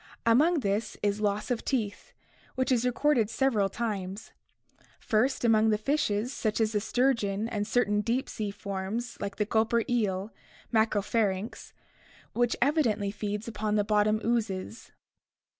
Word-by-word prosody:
Among 295 Hz, +8 st, +4 dB
these 210 Hz, +1 st, -1 dB
is 205 Hz, 0 st, 0 dB
loss 210 Hz, +3 st, -1 dB
of 240 Hz, -, -1 dB
teeth, 220 Hz, -7 st, -2 dB, 0.4 s
which 260 Hz, +1 st, 0 dB
is 250 Hz, -1 st, +2 dB
recorded 250 Hz, -3 st, +2 dB
several 225 Hz, -7 st, +1 dB
times: 200 Hz, -2 st, -4 dB, 0.7 s
first, 245 Hz, +4 st, +1 dB
among 220 Hz, -1 st, +4 dB
the 210 Hz, -, +3 dB
fishes 240 Hz, -1 st, 0 dB
such 215 Hz, -1 st, -1 dB
as 220 Hz, -1 st, +2 dB
the 210 Hz, -, +1 dB
sturgeon 225 Hz, -3 st, 0 dB
and 210 Hz, -3 st, -2 dB
certain 210 Hz, -3 st, +2 dB
deep 240 Hz, +5 st, -1 dB
sea 210 Hz, -2 st, -4 dB
forms 200 Hz, +4 st, -4 dB
like 200 Hz, 0 st, -4 dB
the 210 Hz, -, 0 dB
"gulper" 225 Hz, +2 st, +2 dB
eel, 205 Hz, -4 st, -1 dB, 0.4 s
Macropharynx, 215 Hz, -2 st, 0 dB, 0.6 s
which 240 Hz, 0 st, +1 dB
evi 300 Hz, +4 st, +3 dB
dently 205 Hz, -4 st, -1 dB
feeds 210 Hz, +1 st, -4 dB
upon 215 Hz, -1 st, -2 dB
the 205 Hz, -, +3 dB
bottom 210 Hz, +1 st, +2 dB
oozes. 220 Hz, -2 st, -2 dB
215 Hz, 140 wpm, -28 LUFS, 205-235 Hz, 0.7 s, Among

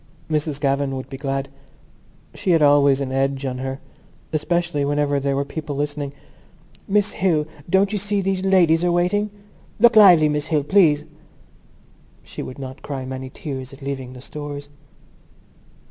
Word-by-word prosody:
Miss 150 Hz, -2 st, -1 dB
Gavan 140 Hz, -1 st, 0 dB
would 130 Hz, 0 st, -6 dB
be 135 Hz, -, -5 dB
glad. 135 Hz, 0 st, -2 dB, 0.9 s
She -, -, -4 dB
had 165 Hz, -3 st, +4 dB
always 145 Hz, -1 st, +5 dB
had 135 Hz, -1 st, -3 dB
an -, -, -5 dB
edge 135 Hz, +1 st, 0 dB
on 125 Hz, -1 st, -3 dB
her, 135 Hz, +1 st, -4 dB, 0.5 s
especially 170 Hz, -1 st, 0 dB
whenever 145 Hz, 0 st, +1 dB
there 140 Hz, 0 st, -1 dB
were 140 Hz, +1 st, -1 dB
people 150 Hz, 0 st, -5 dB
listening. 145 Hz, 0 st, -3 dB, 0.8 s
"Miss 205 Hz, +1 st, +2 dB
Hill, 165 Hz, -5 st, +1 dB, 0.2 s
don't 195 Hz, +2 st, +3 dB
you 210 Hz, -, -1 dB
see 205 Hz, +1 st, -1 dB
these 190 Hz, -1 st, -1 dB
ladies 175 Hz, -4 st, +4 dB
are 175 Hz, -, +2 dB
waiting?" 180 Hz, +5 st, +1 dB, 0.5 s
"Look 235 Hz, +1 st, +6 dB
lively, 180 Hz, -7 st, +8 dB
Miss 150 Hz, 0 st, -1 dB
Hill, 150 Hz, -3 st, +1 dB
please." 155 Hz, -3 st, +3 dB, 1.2 s
She -, -, -8 dB
would 130 Hz, -, -7 dB
not 130 Hz, -1 st, -8 dB
cry 135 Hz, -3 st, -5 dB
many 130 Hz, 0 st, -6 dB
tears 135 Hz, -2 st, -7 dB
at 135 Hz, +1 st, -13 dB
leaving 135 Hz, -2 st, -5 dB
the 125 Hz, -, -11 dB
Stores. 145 Hz, 0 st, -7 dB
145 Hz, 160 wpm, -21 LUFS, 135-175 Hz, 1.2 s, lively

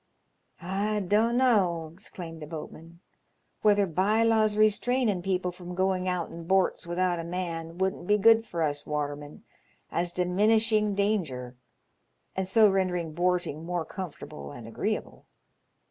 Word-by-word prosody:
" -, -, -47 dB
I 200 Hz, +4 st, -1 dB
dun'no," 210 Hz, -4 st, +2 dB
exclaimed 170 Hz, -3 st, -8 dB
a 150 Hz, -, -7 dB
boatman, 165 Hz, +1 st, -9 dB, 0.6 s
"whether 205 Hz, -1 st, +4 dB
bye 195 Hz, +6 st, +2 dB
laws 220 Hz, -2 st, +3 dB
restrainin' 215 Hz, -1 st, +2 dB
people 180 Hz, -1 st, -1 dB
from 180 Hz, 0 st, -9 dB
going 185 Hz, 0 st, 0 dB
out 180 Hz, -2 st, -2 dB
in 165 Hz, 0 st, -9 dB
borts 190 Hz, -2 st, +1 dB
without 175 Hz, 0 st, 0 dB
a -, -, -3 dB
man 170 Hz, -1 st, -4 dB
wouldn't 190 Hz, -2 st, -2 dB
be 210 Hz, -, +4 dB
good 225 Hz, +2 st, +5 dB
for 170 Hz, -1 st, -2 dB
us 145 Hz, -1 st, -2 dB
watermen, 145 Hz, 0 st, -4 dB, 0.5 s
as 175 Hz, +1 st, 0 dB
diminishing 210 Hz, +4 st, +2 dB
danger, 160 Hz, -, -1 dB, 0.8 s
and 190 Hz, -1 st, -1 dB
so 215 Hz, +3 st, +6 dB
rendering 180 Hz, -4 st, 0 dB
borting 175 Hz, -2 st, 0 dB
more 175 Hz, -1 st, -2 dB
comfortable 155 Hz, -4 st, -8 dB
and 120 Hz, -6 st, -10 dB
agreeable. 210 Hz, -, -4 dB
180 Hz, 135 wpm, -28 LUFS, 165-210 Hz, 0.8 s, so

